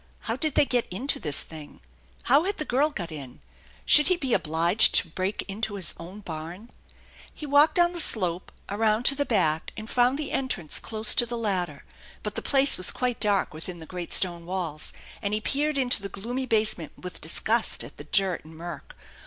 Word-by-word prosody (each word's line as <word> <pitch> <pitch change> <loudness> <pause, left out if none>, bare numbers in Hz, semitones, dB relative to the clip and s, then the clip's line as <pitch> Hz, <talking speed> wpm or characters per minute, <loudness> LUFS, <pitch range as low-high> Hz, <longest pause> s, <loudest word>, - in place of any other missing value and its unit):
How - - -2
did 310 -4 0
they - - +5
get 245 -3 0
into 250 +10 -2
this 150 -3 -1
thing? 155 -2 -12 0.4
How 280 +7 +3
had 400 +1 -2
the 305 - -4
girl 280 +4 +1
got 175 - -6
in? 140 -5 -9 0.5
Should 300 - +7
he 365 -1 +2
be 270 -7 -2
obliged 170 +6 +3
to 170 - +5
break 185 +5 -3
into 205 +1 -3
his 185 -5 +1
own 180 +5 -10
barn? 175 +6 -8 0.6
He 305 - -9
walked 290 +2 +4
down 345 0 +3
the 345 - -3
slope, 185 - +2 0.2
around 215 +2 0
to 275 - +3
the 285 0 -1
back, 160 -8 0
and 215 0 -7
found 250 +3 +2
the 300 -1 -4
entrance 220 - -1
close 220 -1 0
to 240 - +4
the 240 0 -4
ladder; 195 -6 -2 0.4
but - - -4
the - - -3
place 275 0 +3
was 185 - +4
quite 250 -2 -1
dark 205 -5 +1
within 170 +3 -8
the 160 - -10
great 175 0 -7
stone 170 -2 +2
walls, 175 -5 -3 0.3
and 205 -1 -1
he - - -1
peered 290 +6 -1
into 250 -5 +3
the 200 - -6
gloomy 245 +7 -5
basement 215 -8 0
with 180 -1 -7
disgust 220 +8 0
at - - -12
the - - -9
dirt 190 -4 +1
and 160 +1 -14
murk. 170 -3 -9
210 Hz, 200 wpm, -26 LUFS, 175-255 Hz, 0.6 s, Should